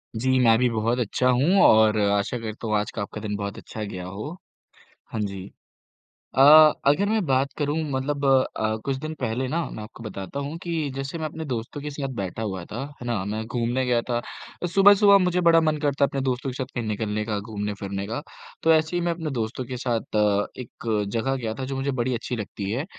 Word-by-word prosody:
जी, 130 +3 +2
मैं 115 -3 +5
भी 125 -1 +3
बहुत 115 +2 0
अच्छा 125 +2 +1
हूँ 145 +11 +4
और 110 0 +6
आशा 100 +4 +1
करता 110 0 -6
हूँ 110 - +1
आज 105 - -2
का 105 - -4
आपका 105 +1 -6
दिन 105 -1 -3
बहुत 100 0 -4
अच्छा 110 - -7
गया 95 -3 -6
हो। 105 - -6 0.8
हाँ 110 - -2
जी, 100 -2 -4 0.9
अ, 135 - +4 0.5
अगर 145 +8 +4
मैं 220 -3 +1
बात 135 0 +1
करूँ 145 0 0
मतलब 140 +2 -1
अ, 130 -5 +2
कुछ 135 - 0
दिन 155 +3 -5
पहले 125 +1 -1
ना 165 +6 -1
मैं 110 - -7
आपको 115 +2 -11
बताता 105 +4 -6
हूँ 145 +3 -4
कि 165 -4 -2
जैसे 135 +4 -4
मैं 160 - -3
अपने 160 +1 -5
दोस्तों 125 +1 -4
के 150 - -4
साथ 140 -1 -4
बैठा 100 0 -4
हुआ 95 -5 -3
था, 115 +8 -6 0.2
है - - -6
ना, 115 -6 -1
मैं 110 +2 -3
घूमने 120 +2 -1
गया 120 -1 +2
था, 120 -1 0 0.5
सुबह-सुबह 200 0 +7
मुझे 180 -1 +1
बड़ा 165 -1 +6
मन 155 -1 +1
करता 145 -1 +1
है - - +5
अपने 135 - -3
दोस्तों 130 +1 -1
के - - -5
साथ 130 0 -3
कहीं 120 - -1
निकलने 105 0 -2
का, 105 -2 -2
घूमने 105 -1 -4
फिरने 100 0 -4
का, 115 +7 -3 0.4
तो 165 - +5
ऐसे 160 +2 +1
ही 175 - +1
मैं 175 0 +1
अपने 165 -2 -4
दोस्तों 115 +3 -2
के 125 +1 -5
साथ 120 -3 -2
अ, 105 -1 +2
एक 110 -3 -3
जगह 135 +4 0
गया 115 -4 -3
था 130 - -2
जो 135 +1 -4
मुझे 135 +1 -1
बड़ी 125 +2 0
अच्छी 125 +1 -3
लगती 100 -2 -5
है, 130 +7 -2
125 Hz, 225 wpm, -25 LUFS, 110-140 Hz, 0.9 s, सुबह-सुबह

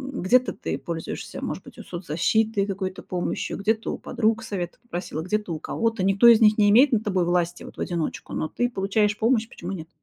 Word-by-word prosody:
м, - - -3
где-то 250 +7 +3
ты - - -4
пользуешься, 165 -2 -6
может - - -4
быть, - - -13
вот - - -10
соцзащитой, 195 +5 0
какой-то 190 -2 -4
помощью, 180 -1 -3
где-то 220 +2 0
у - - -4
подруг 225 -2 0
совета 185 -6 -5
попросила, 175 -8 -5
где-то 210 +1 -2
у 155 - -4
кого-то. 225 +2 -1
Никто 195 +5 +5
из 230 -2 +8
них 215 -1 +5
не 205 -1 +5
имеет 255 +5 +6
над 220 -1 +2
тобой 185 -4 +1
власти 175 0 0
вот - - -11
в - - -7
одиночку, 170 -3 -3
но 155 - -1
ты 245 +9 -1
получаешь 205 0 +1
помощь. 225 0 +2
Почему 180 +3 -6
нет? 165 -2 -7
200 Hz, 210 wpm, -24 LUFS, 175-225 Hz, -, из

